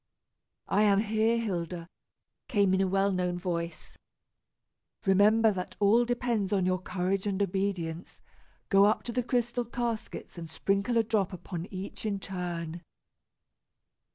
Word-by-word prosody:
"I 205 Hz, -, +2 dB
am 205 Hz, -1 st, +4 dB
here, 220 Hz, +1 st, +2 dB
Hilda," 175 Hz, -6 st, -3 dB, 0.6 s
came 200 Hz, -2 st, +3 dB
in 190 Hz, -, +3 dB
a 190 Hz, -, +2 dB
well 195 Hz, +1 st, +2 dB
known 180 Hz, -1 st, -1 dB
voice. 170 Hz, -2 st, -4 dB, 1.1 s
"Remember 210 Hz, +3 st, +5 dB
that 185 Hz, -2 st, -5 dB
all 215 Hz, +4 st, +5 dB
depends 240 Hz, -5 st, -1 dB
upon 195 Hz, -3 st, +2 dB
your 185 Hz, 0 st, +1 dB
courage 185 Hz, +2 st, -1 dB
and 195 Hz, -1 st, -1 dB
obedience. 185 Hz, -4 st, -2 dB, 0.5 s
Go 195 Hz, 0 st, +6 dB
up 215 Hz, -, +2 dB
to 240 Hz, -, -4 dB
the 250 Hz, +1 st, 0 dB
crystal 245 Hz, 0 st, 0 dB
caskets 235 Hz, -5 st, -4 dB
and 165 Hz, -1 st, -7 dB
sprinkle 200 Hz, +8 st, 0 dB
a 230 Hz, -, +4 dB
drop 205 Hz, -4 st, 0 dB
upon 175 Hz, -1 st, -6 dB
each 190 Hz, 0 st, -7 dB
in 200 Hz, -2 st, -1 dB
turn." 175 Hz, -3 st, -5 dB
195 Hz, 140 wpm, -29 LUFS, 180-220 Hz, 1.1 s, Go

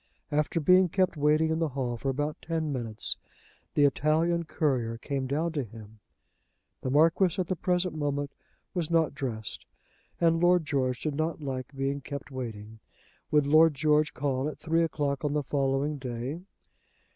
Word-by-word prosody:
After 150 Hz, +2 st, +1 dB
being 180 Hz, +3 st, +5 dB
kept 185 Hz, +1 st, +1 dB
waiting 155 Hz, +2 st, +3 dB
in 160 Hz, -, 0 dB
the 165 Hz, -, +1 dB
hall 125 Hz, -3 st, -1 dB
for 135 Hz, +4 st, -3 dB
about 145 Hz, +3 st, -2 dB
ten 160 Hz, -3 st, -2 dB
minutes, 115 Hz, -4 st, -3 dB, 0.6 s
the 145 Hz, -, +5 dB
Italian 160 Hz, +5 st, +2 dB
courier 130 Hz, -7 st, 0 dB
came 135 Hz, +1 st, -3 dB
down 155 Hz, +5 st, 0 dB
to 150 Hz, -4 st, -1 dB
him. 110 Hz, -1 st, -12 dB, 0.8 s
The -, -, -2 dB
Marquis 165 Hz, +6 st, +3 dB
at 185 Hz, -, +1 dB
the 185 Hz, -, -1 dB
present 180 Hz, +1 st, 0 dB
moment 145 Hz, -2 st, -2 dB, 0.4 s
was 170 Hz, -4 st, -2 dB
not 165 Hz, -4 st, +2 dB
dressed, 115 Hz, -6 st, -5 dB, 0.5 s
and 165 Hz, -1 st, +3 dB
Lord 175 Hz, -1 st, +4 dB
George 130 Hz, -4 st, 0 dB
did 155 Hz, -, -1 dB
not 155 Hz, +3 st, -1 dB
like 130 Hz, -2 st, -4 dB
being 135 Hz, +1 st, -1 dB
kept 140 Hz, 0 st, -7 dB
waiting. 110 Hz, -4 st, -6 dB, 0.5 s
Would 150 Hz, -1 st, +3 dB
Lord 155 Hz, +1 st, +6 dB
George 150 Hz, +1 st, +2 dB
call 135 Hz, 0 st, -1 dB
at -, -, -8 dB
three 165 Hz, 0 st, +1 dB
o'clock 145 Hz, -4 st, -1 dB
on 145 Hz, -1 st, 0 dB
the 150 Hz, -1 st, 0 dB
following 140 Hz, +2 st, 0 dB
day. 130 Hz, +5 st, -4 dB
145 Hz, 165 wpm, -28 LUFS, 135-160 Hz, 0.8 s, Lord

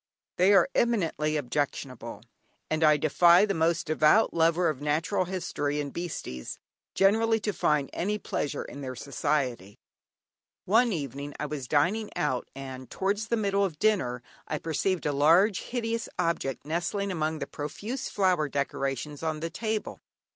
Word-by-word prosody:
They 185 Hz, +3 st, +5 dB
are -, -, +6 dB
eminently 165 Hz, -10 st, +1 dB
objectionable, 125 Hz, -4 st, -3 dB, 0.5 s
and 155 Hz, +1 st, +1 dB
I 150 Hz, -1 st, +6 dB
defy 170 Hz, +5 st, +5 dB
the 200 Hz, -, -1 dB
most 165 Hz, 0 st, +1 dB
devout 155 Hz, +7 st, +4 dB
lover 165 Hz, +1 st, +3 dB
of 145 Hz, -3 st, -2 dB
natural 160 Hz, +6 st, 0 dB
history 150 Hz, -5 st, -2 dB
and 145 Hz, -1 st, -4 dB
"beasties" 160 Hz, -, -5 dB, 0.4 s
generally, 225 Hz, +3 st, +3 dB
to 210 Hz, 0 st, -1 dB
find 150 Hz, -4 st, +1 dB
any 205 Hz, +4 st, -1 dB
pleasure 145 Hz, -7 st, -3 dB
in 140 Hz, -, -9 dB
their 130 Hz, -2 st, -5 dB
society. 130 Hz, -6 st, -2 dB, 0.9 s
One 230 Hz, +5 st, +4 dB
evening 140 Hz, -, -4 dB
I 150 Hz, -, -2 dB
was 145 Hz, -4 st, -5 dB
dining 180 Hz, -, +1 dB
out, 130 Hz, -4 st, -1 dB
and 130 Hz, -2 st, -8 dB
towards 205 Hz, +3 st, -1 dB
the 235 Hz, -, +1 dB
middle 200 Hz, -2 st, +1 dB
of 175 Hz, -6 st, -2 dB
dinner 155 Hz, -, +1 dB, 0.2 s
I 155 Hz, -, -2 dB
perceived 165 Hz, +4 st, -1 dB
a 145 Hz, -, +1 dB
large, 170 Hz, +8 st, +4 dB
hideous 230 Hz, -2 st, -3 dB
object 140 Hz, -6 st, -1 dB
nestling 175 Hz, +5 st, -2 dB
among 160 Hz, -2 st, -1 dB
the -, -, -4 dB
profuse 210 Hz, -, -5 dB
flower 180 Hz, -7 st, +1 dB
decorations 140 Hz, 0 st, -3 dB
on 160 Hz, -1 st, -2 dB
the 165 Hz, +1 st, -4 dB
table. 220 Hz, +2 st, -3 dB
160 Hz, 150 wpm, -28 LUFS, 145-195 Hz, 0.9 s, are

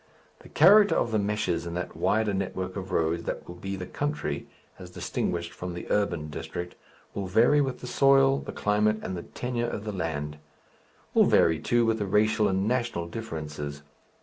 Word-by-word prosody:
The -, -, -15 dB
character 205 Hz, +6 st, +6 dB
of 120 Hz, -, +1 dB
the 110 Hz, -, +2 dB
meshes 95 Hz, -5 st, -1 dB
in 85 Hz, -, -5 dB
that 90 Hz, -, -4 dB
wider 110 Hz, -1 st, +1 dB
network 95 Hz, -1 st, -3 dB
of 95 Hz, -2 st, -6 dB
roads 85 Hz, -1 st, 0 dB
that -, -, -4 dB
will 85 Hz, -, -7 dB
be 95 Hz, +2 st, -5 dB
the 90 Hz, -1 st, -6 dB
country, 145 Hz, +9 st, -3 dB, 0.3 s
as -, -, -9 dB
distinguished 85 Hz, -1 st, -3 dB
from 90 Hz, -2 st, -6 dB
the 90 Hz, -, -6 dB
urban 85 Hz, -7 st, 0 dB
district, 90 Hz, +3 st, -6 dB, 0.4 s
will 100 Hz, -1 st, -3 dB
vary 120 Hz, +10 st, +4 dB
with 135 Hz, -2 st, -2 dB
the -, -, -7 dB
soil, 135 Hz, +2 st, +4 dB
the -, -, -7 dB
climate 105 Hz, +1 st, +1 dB
and 95 Hz, -, -4 dB
the 85 Hz, -, -4 dB
tenure 120 Hz, +4 st, -3 dB
of 105 Hz, -, -5 dB
the 105 Hz, -, -4 dB
land 75 Hz, -4 st, -3 dB, 0.7 s
will -, -, +6 dB
vary, 80 Hz, -1 st, +4 dB
too, 120 Hz, -1 st, +2 dB
with 115 Hz, 0 st, +1 dB
the 100 Hz, -, -2 dB
racial 110 Hz, +2 st, +3 dB
and 95 Hz, +1 st, 0 dB
national 120 Hz, -8 st, -1 dB
differences. 75 Hz, -8 st, -6 dB
100 Hz, 185 wpm, -27 LUFS, 85-115 Hz, 0.7 s, character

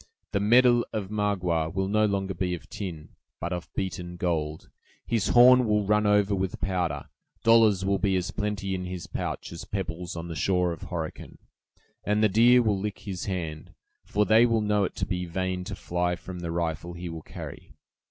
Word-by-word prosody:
The 100 Hz, -, +1 dB
medal 120 Hz, +3 st, +5 dB
of 105 Hz, -3 st, -4 dB
Magua 90 Hz, -6 st, 0 dB
will 95 Hz, +2 st, -1 dB
no 110 Hz, +2 st, +3 dB
longer 95 Hz, -1 st, -1 dB
be 90 Hz, 0 st, -1 dB
of 85 Hz, -, -12 dB
tin, 85 Hz, -7 st, -6 dB, 0.3 s
but 85 Hz, +2 st, -3 dB
of 90 Hz, -1 st, -6 dB
beaten 90 Hz, -2 st, -4 dB
gold; 80 Hz, -3 st, -2 dB, 0.4 s
his 115 Hz, -4 st, 0 dB
horn 125 Hz, 0 st, +7 dB
will 105 Hz, -1 st, +2 dB
run 105 Hz, +1 st, +3 dB
over 105 Hz, 0 st, +3 dB
with 95 Hz, -1 st, -2 dB
powder; 85 Hz, -7 st, -1 dB, 0.4 s
dollars 110 Hz, -4 st, +5 dB
will 100 Hz, 0 st, +1 dB
be 95 Hz, -2 st, +1 dB
as 90 Hz, 0 st, -1 dB
plenty 105 Hz, -2 st, -2 dB
in 90 Hz, -1 st, -3 dB
his 90 Hz, -1 st, -5 dB
pouch -, -, -4 dB
as 85 Hz, -, -7 dB
pebbles 90 Hz, -3 st, -4 dB
on 85 Hz, 0 st, -5 dB
the 85 Hz, -, -5 dB
shore 90 Hz, +3 st, +1 dB
of 80 Hz, -, -9 dB
Horican; 80 Hz, -3 st, -5 dB, 0.7 s
and 105 Hz, +1 st, +1 dB
the 105 Hz, -, +5 dB
deer 120 Hz, +4 st, +6 dB
will 105 Hz, -3 st, +1 dB
lick 105 Hz, +1 st, -3 dB
his 95 Hz, -4 st, -6 dB
hand, 80 Hz, -5 st, -5 dB, 0.3 s
for 105 Hz, +1 st, +1 dB
they 110 Hz, +2 st, +6 dB
will 115 Hz, -2 st, +2 dB
know 105 Hz, -1 st, +2 dB
it -, -, -5 dB
to -, -, -2 dB
be 90 Hz, -2 st, -2 dB
vain 90 Hz, +1 st, -2 dB
to 100 Hz, +1 st, -5 dB
fly 90 Hz, 0 st, -1 dB
from 90 Hz, 0 st, -8 dB
the 85 Hz, -1 st, -4 dB
rifle 85 Hz, 0 st, -2 dB
he 85 Hz, +1 st, -6 dB
will 80 Hz, -1 st, -6 dB
carry! -, -, -10 dB
95 Hz, 195 wpm, -27 LUFS, 85-105 Hz, 0.7 s, horn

